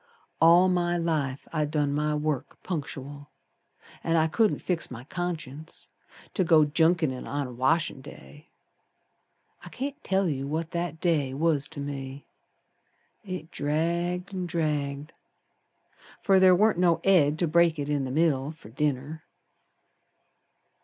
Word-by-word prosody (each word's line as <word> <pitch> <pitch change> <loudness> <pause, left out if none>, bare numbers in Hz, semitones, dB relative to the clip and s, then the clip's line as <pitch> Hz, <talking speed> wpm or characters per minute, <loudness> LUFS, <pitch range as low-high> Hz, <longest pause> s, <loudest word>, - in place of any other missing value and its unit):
All 170 +3 +7
my 175 -1 +1
life 150 -5 -2
I'd 150 -2 0
done 145 -2 0
my 150 +1 0
work 150 -3 -2
punctual, 145 -4 -6 0.7
An' 165 - +1
I 160 -1 +4
couldn't 210 +7 +2
fix 175 -2 -2
my 125 -1 -8
conscience 160 -2 -6 0.4
To 190 - +1
go 160 -3 +5
junketin' 160 -3 +1
on 145 0 -2
a 125 - -7
washin' 135 +4 0
day. 150 +2 -13 1.2
I - - -9
can't 280 +3 -6
tell 190 0 +1
you 140 -3 -2
what 160 +3 -3
that 170 -2 -3
day 150 -7 0
was 150 -1 +1
to 155 -3 -8
me. 140 -1 -6 1.0
It 185 -5 -7
dragged 170 +5 -1
an' 185 -2 -3
dragged, 150 -3 -2 1.1
Fer 195 -2 +5
ther 185 -1 +7
warn't 210 -1 +3
no 175 -2 +3
Ed 155 -6 +4
ter 175 - +1
break 170 0 +3
it 145 -1 -3
in 145 -2 0
the 130 - -3
middle 140 -1 +1
Fer 155 -9 -14
dinner. 145 +4 -2
155 Hz, 140 wpm, -27 LUFS, 145-175 Hz, 1.2 s, All